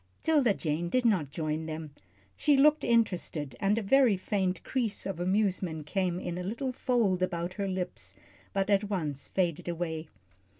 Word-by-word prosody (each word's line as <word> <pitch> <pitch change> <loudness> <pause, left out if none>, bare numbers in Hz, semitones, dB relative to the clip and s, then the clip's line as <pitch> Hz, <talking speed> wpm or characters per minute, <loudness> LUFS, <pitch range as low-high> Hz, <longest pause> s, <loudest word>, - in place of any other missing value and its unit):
'Tilda 295 -8 +4
Jane 165 +2 -2
did 255 +5 +1
not 185 - +2
join 155 +1 -3
them. 155 -1 -5 0.4
She 290 -2 +3
looked 300 +2 +5
interested, 180 - 0
and 200 +2 +2
a 230 - -1
very 245 -1 +4
faint 185 -1 -1
crease 235 -6 -1
of 195 -3 -4
amusement 185 -4 0
came 180 +1 -1
in 175 -1 -4
a - - -4
little 235 +7 -2
fold 235 -8 +1
about 175 -1 -1
her 200 0 -2
lips, 180 - -4 0.4
but 195 +1 0
at 200 +1 +3
once 155 -8 -3
faded 175 -4 -1
away. 165 -2 -3
185 Hz, 165 wpm, -30 LUFS, 165-215 Hz, 0.4 s, looked